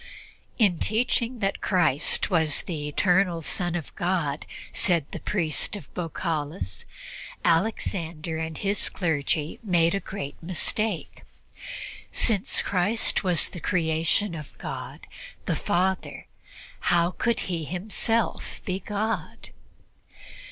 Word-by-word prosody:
"In 200 -8 +4
teaching 235 +2 +1
that 195 0 0
Christ 175 -2 +2
was 160 -4 +3
the 150 -4 -3
Eternal 180 +2 +3
Son 175 -1 -1
of 165 -4 -4
God," 170 -5 0 0.3
said 175 -9 +2
the - - -4
priest 175 -1 0
of 165 -10 -9
Baukalis, 155 - -3 0.6
"Alexander 165 -3 +1
and 160 -1 -3
his 200 0 +1
clergy 155 -2 0
made 170 -5 +3
a 195 - +2
great 190 -8 -6
mistake. 185 +2 -2 0.9
Since 210 -5 +1
Christ 200 +5 +2
was 180 -4 +3
the 175 - -7
creation 165 +4 +1
of 150 -3 -8
God - - -6 0.4
the - - +1
Father, 185 +1 0 0.5
how 175 0 +3
could 235 +5 0
He 170 -3 -2
Himself 210 - -1
be 185 0 -1
God?" 210 +3 -3
175 Hz, 110 wpm, -27 LUFS, 160-200 Hz, 0.9 s, In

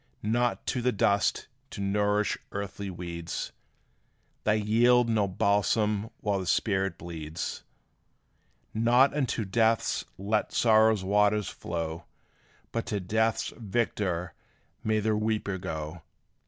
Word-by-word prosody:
Not 120 +3 0
to 125 - -1
the 125 +1 +2
dust 100 -1 +1 0.2
to - - -8
nourish 105 +1 +1 0.2
earthly 100 0 -5
weeds: 85 -2 -5 0.9
They 105 0 +3
yield 120 +3 +4
no 110 -3 +2
balsam 105 +2 +1
while 100 -2 0
the 95 - -5
spirit 95 -4 +1
bleeds! 80 -2 -5 1.1
Not 120 +5 +4
unto 125 -6 -1
death 110 +2 +2
let 105 +3 0
sorrow's 110 -3 +4
waters 105 +1 +2
flow, 85 0 -4 0.7
But 115 - -3
to 105 - -1
death's 110 +4 0
victor 95 -6 -1 0.5
may 110 0 +2
the 110 0 +1
weeper 105 -3 -1
go! 80 -2 -5
105 Hz, 115 wpm, -28 LUFS, 95-110 Hz, 1.1 s, yield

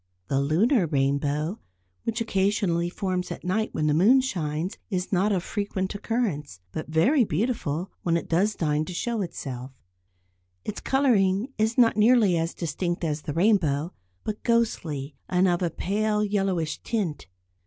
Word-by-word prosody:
The 135 0 +2
lunar 180 - +3
rainbow, 145 +5 0 0.5
which 230 +1 -1
occasionally 195 -5 +1
forms 185 0 -2
at - - -6
night 215 +5 0
when 155 - -1
the 150 - +3
moon 210 - +6
shines, 170 - -3
is 185 -3 -2
not 195 +2 +2
of 185 -3 0
frequent 200 -2 -2
occurrence, 200 - -2
but 155 - -5
very 235 - +4
beautiful 185 - -1
when 170 -1 +1
it - - -5
does 200 +6 +2
deign 150 -2 0
to 180 - -7
show 235 +3 -1
itself. 130 -8 -5 1.0
Its 210 - -4
colouring 235 -3 +2
is 220 +2 +1
not 230 -4 +5
nearly 215 -4 +5
as 165 0 -1
distinct 175 +2 -2
at 155 -3 0
the 145 -1 -5
rainbow, 165 -4 +2 0.3
but 215 -1 -4
ghostly, 160 - 0
and 185 +1 +3
of 175 0 +1
a 175 - +1
pale 210 +5 0
yellowish 195 -6 0
tint. 180 - -2
185 Hz, 155 wpm, -26 LUFS, 155-215 Hz, 1.0 s, moon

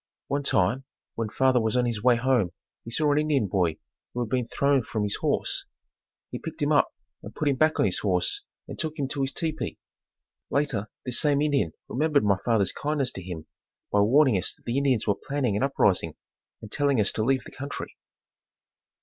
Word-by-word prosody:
One 140 +1 0
time 125 0 +2 0.3
when 115 -2 -3
father 130 +1 +3
was 110 +2 0
on 125 - +3
his 115 -3 -2
way 125 +1 +5
home 120 -7 +1 0.3
he - - -8
saw 150 +5 +2
an 145 - +3
Indian 150 -6 +2
boy 90 -5 +1 0.4
who 125 - -1
had 120 - -2
been 125 0 0
thrown 140 +1 +2
from 110 -2 -3
his 105 - -1
horse. - - -1 0.7
He - - -4
picked - - -7
him - - +1
up - - +4 0.3
and 105 - -10
put 155 - -1
him 140 - +3
back 155 +2 +3
on - - +4
his 95 - 0
horse 90 -3 0 0.3
and - - -8
took 155 0 -2
him 140 -3 -1
to 140 0 -2
his 135 0 0
tepee. 160 -1 -3 0.7
Later 125 -8 0 0.2
this 125 -2 +2
same 145 -2 +3
Indian 145 - +1
remembered 150 +2 +2
my 100 -2 +2
father's 110 -5 +2
kindness 145 -3 -1
to 95 - -7
him 85 -3 -7 0.5
by 105 - +3
warning 125 +1 +5
us - - -2
that - - -31
the 120 +3 0
Indians 135 -6 +1
were 100 - +3
planning 125 +1 -2
an 105 - 0
uprising 95 - +2 0.5
and 110 - -9
telling 140 -4 +2
us 105 - +2
to 110 - -1
leave 130 +2 +2
the - - -11
country. 140 +2 -6
125 Hz, 205 wpm, -26 LUFS, 105-140 Hz, 0.7 s, way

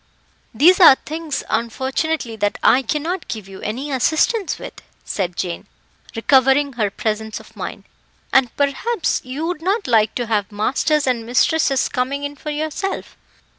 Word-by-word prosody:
"These 335 - +5
are 325 -7 +9
things, 310 0 -5
unfortunately, 260 +3 -2
that 205 -1 0
I 260 - +5
cannot 305 +8 -3
give 215 -4 -6
you 195 -1 -11
any 260 +8 -4
assistance 315 - +1
with," - - -10 0.2
said 180 -3 -2
Jane, 175 -2 -4 0.5
recovering 270 +4 +3
her 215 -4 0
presence 220 +1 -3
of - - -17
mind, - - -6 0.5
"and 265 -2 +5
perhaps 290 - 0
you 265 +5 -4
would 340 -2 -3
not 395 +5 0
like 220 -3 +2
to 245 - -1
have 210 -3 -1
masters 275 +8 +1
and 250 -3 0
mistresses 270 +3 +2
coming 270 +3 -2
in 285 0 -4
for 300 - -7
yourself. 310 +6 -3
265 Hz, 150 wpm, -20 LUFS, 225-310 Hz, 0.5 s, are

